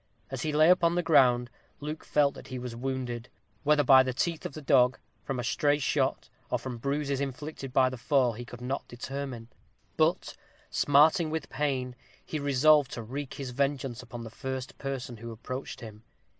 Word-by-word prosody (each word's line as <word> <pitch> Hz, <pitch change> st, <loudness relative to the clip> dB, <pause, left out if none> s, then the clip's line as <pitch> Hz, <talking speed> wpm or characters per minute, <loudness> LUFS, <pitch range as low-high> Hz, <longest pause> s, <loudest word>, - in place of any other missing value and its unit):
As 135 Hz, -2 st, -4 dB
he 155 Hz, -, -1 dB
lay 155 Hz, +3 st, +6 dB
upon 170 Hz, -2 st, +3 dB
the 175 Hz, -, +1 dB
ground, 125 Hz, -7 st, +4 dB, 0.3 s
Luke 150 Hz, +2 st, -5 dB
felt 145 Hz, -1 st, +2 dB
that -, -, -11 dB
he 130 Hz, -, -5 dB
was 125 Hz, -1 st, -6 dB
wounded; 125 Hz, -1 st, -4 dB, 0.3 s
whether 150 Hz, 0 st, +4 dB
by 135 Hz, -3 st, +8 dB
the 130 Hz, -1 st, -2 dB
teeth 165 Hz, +3 st, -1 dB
of -, -, -14 dB
the 155 Hz, -, -7 dB
dog, 130 Hz, -2 st, +4 dB, 0.3 s
from 135 Hz, -3 st, -3 dB
a -, -, -2 dB
stray 145 Hz, +4 st, +2 dB
shot, 140 Hz, -2 st, 0 dB, 0.2 s
or 125 Hz, -, +1 dB
from 125 Hz, -1 st, -6 dB
bruises 140 Hz, +1 st, -1 dB
inflicted 140 Hz, 0 st, -5 dB
by 130 Hz, 0 st, +4 dB
the 130 Hz, -1 st, -5 dB
fall, 125 Hz, -1 st, +2 dB
he 120 Hz, +3 st, -7 dB
could 120 Hz, 0 st, -11 dB
not 130 Hz, +2 st, -3 dB
determine. 130 Hz, -1 st, -6 dB, 0.5 s
But, -, -, +1 dB, 0.4 s
smarting 155 Hz, +3 st, +4 dB
with 160 Hz, +1 st, -3 dB
pain, 130 Hz, -3 st, -1 dB, 0.3 s
he 155 Hz, -, -3 dB
resolved 145 Hz, +1 st, +4 dB
to 115 Hz, -, -5 dB
wreak 135 Hz, +4 st, -6 dB
his 135 Hz, -3 st, -5 dB
vengeance 135 Hz, -2 st, -1 dB
upon 120 Hz, -2 st, -8 dB
the 115 Hz, -, -8 dB
first 130 Hz, +1 st, -5 dB
person 135 Hz, -3 st, -4 dB
who 115 Hz, +2 st, -8 dB
approached 130 Hz, +4 st, -6 dB
him. 110 Hz, -2 st, -10 dB
135 Hz, 185 wpm, -29 LUFS, 125-145 Hz, 0.5 s, by